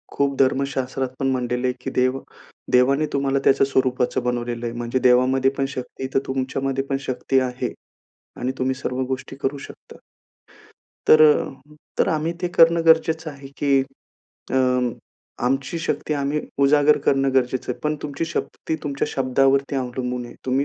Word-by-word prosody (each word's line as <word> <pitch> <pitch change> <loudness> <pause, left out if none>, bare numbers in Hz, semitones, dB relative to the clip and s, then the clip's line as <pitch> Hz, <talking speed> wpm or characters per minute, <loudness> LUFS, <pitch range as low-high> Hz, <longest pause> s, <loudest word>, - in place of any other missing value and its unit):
खूप 140 -1 0
धर्मशास्त्रात 135 -1 0
पण 135 - 0
म्हटलेलं 125 0 -1
आहे, 125 - 0
की 135 - -4
देव 130 +1 +1 0.5
देवाने 135 +4 +4
तुम्हाला 140 0 +1
त्याच्या 135 0 +4
स्वरूपाचं 130 -2 0
बनवलेलं 120 -1 -2
आहे. 115 - -3
म्हणजे 120 +2 -2
देवामध्ये 130 +2 +3
पण 135 - +1
शक्ती 130 +1 -5
तर - - +4
तुमच्यामध्ये 135 +1 -2
पण 135 - +1
शक्ती 130 +1 +1
आहे 125 -1 -3 0.7
आणि 130 +1 -1
तुम्ही 130 +1 0
सर्व 125 +1 -2
गोष्टी 130 +1 -5
करू 140 +1 -1
शकता. - - -12 1.1
तर 155 - +7
अ, 150 -1 +2 0.2
तर - - +3
आम्ही 160 -1 0
ते 180 - +1
करणं 165 0 +5
गरजेचं 160 0 +3
आहे, 140 -1 -11
की 140 -2 +3 0.7
अ, - - +2 0.9
आमची 135 +6 -1
शक्ती 155 -1 -2
आम्ही 145 +1 -1 0.2
उजागर 145 +1 +5
करणं 135 -1 +2
गरजेचं 130 -1 0
आहे. - - -12
पण 150 0 0
तुमची 150 +2 -3
शक्ती 165 -1 -4
तुमच्या 140 -2 -2
शब्दावरती 135 +1 +1
अवलंन 125 -1 -3
आहे. 120 - -12
तुम्ही 130 +2 +1
135 Hz, 155 wpm, -22 LUFS, 130-140 Hz, 1.1 s, तर